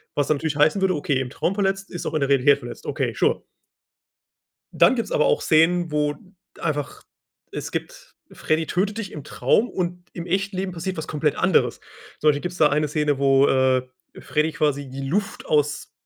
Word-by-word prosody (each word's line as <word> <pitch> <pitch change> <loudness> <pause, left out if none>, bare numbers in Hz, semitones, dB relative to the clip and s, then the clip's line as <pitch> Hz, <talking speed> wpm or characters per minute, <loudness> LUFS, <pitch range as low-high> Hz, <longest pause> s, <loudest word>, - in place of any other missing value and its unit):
was 145 - +1
dann 155 - +2
natürlich 155 -1 -2
heißen 155 +7 +3
würde: 190 -2 +2
„Okay, 145 -2 0
im 130 -2 -3
Traum 180 +7 -2
verletzt 195 -1 -1
ist 175 - -6
auch 155 - -3
in 155 - +1
der 140 - 0
Realität 140 +1 +4
verletzt.” 120 -2 -9
Okay, - - -2
sure. - - +1 1.3
Dann - - +5
gibt's 230 - -3
aber - - +3
auch 480 -2 +2
Szenen, 170 +1 +3
wo 150 0 +1 0.4
einfach 150 -4 -3 0.5
es - - -5
gibt - - -7 0.2
Freddy 155 0 -1
tötet 200 +4 -1
dich 210 -4 -5
im 150 -3 -8
Traum 210 - +1
und 180 -1 -4
im 170 0 -6
echten 195 +2 -1
Leben 190 0 -2
passiert 180 +2 -4
was 160 - -5
komplett 150 -1 -1
anderes. - - +2 0.4
Zum 155 - +2
Beispiel 145 -1 +3
gibt's 180 +2 -5
da 150 -3 +4
eine 150 +1 +1
Szene, 150 -1 0
wo, 135 0 +4
äh, 130 -1 +3 0.4
Freddy 155 +1 0
quasi 145 -4 -1
die 135 +1 -6
Luft 195 +8 -2
aus 150 -1 0
155 Hz, 195 wpm, -23 LUFS, 145-180 Hz, 1.3 s, Dann